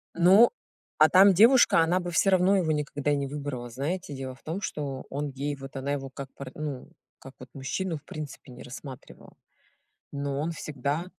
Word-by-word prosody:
Ну, 190 +7 +7 0.5
а 155 0 +7
там 195 +3 +7
девушка- 230 0 +6
она 170 +3 +3
бы 175 -1 -5
всё 195 - +3
равно 185 +1 +4
его 165 -4 +1
никогда 145 -1 -1
и - - +3
не 140 -1 -2
выбрала. 140 -4 -5
Знаете, 150 +7 -4
дело 130 -1 -6
в - - -25
том, 170 +6 -4
что 140 -7 -4
он 145 +1 -3
ей 140 +2 -3
вот 135 0 -11
она 135 +1 -3
его, 135 -1 -4
как 135 +1 -8
пар 135 -2 -8
ну, 145 -4 -5 0.3
как 135 0 -12
вот 130 -1 -11
мужчину, 160 +5 -3
в 145 - -18
принципе 150 -3 -8
не 125 - -11
рассматривала. 130 +1 -11 0.8
Но 140 -1 -3
он 160 +3 -1
всегда 150 +1 -3
145 Hz, 195 wpm, -27 LUFS, 135-170 Hz, 0.8 s, Ну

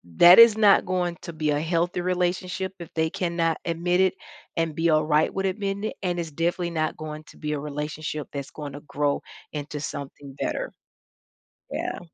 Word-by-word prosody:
that 175 - +9
is 230 -2 +9
not 205 -2 +6
going 180 -2 -1
to 170 - -7
be 155 -1 -1
a 145 - +1
healthy 170 +2 0
relationship 180 +1 -1
if 170 - -9
they 160 0 +1
cannot 170 -4 0
admit 175 +2 0
it 190 -1 +4 0.4
and 165 -2 0
be 165 +2 +1
alright 155 0 +3
with 195 0 -1
admitting 200 +1 -2
it, - - -3
and 175 -1 0
it's 165 -2 -4
definitely 170 +3 -1
not 155 -2 -1
going 155 0 -6
to - - -16
be 150 -1 -3
a 145 - -2
relationship 150 +1 -4
that's 140 -1 -5
going 145 -2 -7
to 145 - -8
grow 145 0 0 0.3
into 150 0 -5
something 140 -1 -7
better. - - -2 1.0
Yeah. - - -3
165 Hz, 185 wpm, -25 LUFS, 150-180 Hz, 1.0 s, that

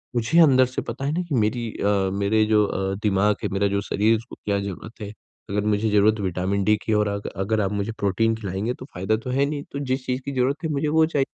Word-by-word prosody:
मुझे 120 +8 +2
अंदर 130 -5 +6
से 125 +1 -4
पता 125 +4 -4
है 145 - 0
ना 175 - 0
कि 145 - 0
मेरी 115 +1 0
अ, 100 -1 +1
मेरे 100 +2 +2
जो 105 -1 +3
अ, 95 -1 -2
दिमाग 105 0 +2
है, - - 0
मेरा 100 +1 +2
जो 100 0 0
शरीर 105 +1 0
है - - +5
उसको 115 - -11
क्या 100 -1 +1
ज़रूरत 100 +4 -7
है। 105 0 -6 0.4
अगर 105 +1 -1
मुझे 105 +1 +1
ज़रूरत 105 +1 +3
विटामिन 95 +1 -1
डी 105 +2 +4
की 110 - 0
और 105 0 +2
अग 100 0 -4
अगर 105 +3 0
आप 95 - -1
मुझे 100 +1 -2
प्रोटीन 105 +3 +1
खिलाएँगे 105 +2 -3
तो 130 - -10
फायदा 95 +5 0
तो - - -5
है 135 +2 +2
नहीं। 145 0 -3
तो 140 - -4
जिस 130 -1 -2
चीज़ 125 +1 -2
की 140 - -3
ज़रूरत 135 +3 0
है 160 - -1
मुझे 150 +1 -1
वो 160 +1 +4
चाहिए। 145 -4 0
110 Hz, 260 wpm, -23 LUFS, 100-130 Hz, 0.4 s, अंदर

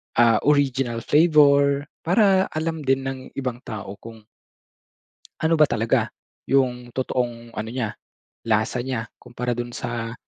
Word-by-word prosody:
ah, 115 -2 +5
original 135 -5 +1
flavor. 145 -3 +4 0.2
Para 190 +1 +3
alam 160 +1 -2
din 135 0 +2
ng 135 0 -3 0.2
ibang 125 -3 -3
tao 100 -2 -7
kung 115 -1 -12 1.2
ano 160 +1 +2
ba 155 -2 +4
talaga 115 +1 +1 0.4
yung 125 -3 +1
totoong 120 -2 -3
ano 110 +1 -4
niya, 115 -3 -3 0.5
lasa 115 +3 0
niya, 120 -4 -3
kumpara 120 0 -4
dun 120 0 -4
sa 115 -1 -4
125 Hz, 130 wpm, -23 LUFS, 115-140 Hz, 1.2 s, ah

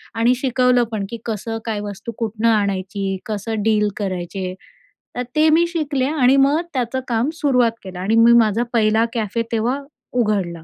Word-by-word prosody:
आणि 230 +2 +3
शिकवलं 250 -1 +2
पण 210 -3 -2
की 235 - -5
कसं 225 0 -3
काय 220 -2 -2
वस्तू 205 +3 -6
कुठनं 225 0 -1
आणायची, 195 -2 -1
कसं 215 0 -3
डील 210 -1 +2
करायचे 185 -1 -4 0.6
तर 250 - -1
ते 310 +1 +5
मी 330 +2 +4
शिकले 300 -6 -1
आणि 275 -2 +3
मग 280 +4 +4
त्याचं 255 0 -1
काम 235 +3 0
सुरुवात 250 -6 +3
केलं 185 -1 -8
आणि 200 +4 0
मी 235 +1 +7
माझा 220 +1 +2
पहिला 220 0 +3
कॅफे 225 -1 -1
तेव्हा 235 +5 0 0.3
उघडला. 200 -8 0
225 Hz, 165 wpm, -20 LUFS, 205-250 Hz, 0.6 s, मी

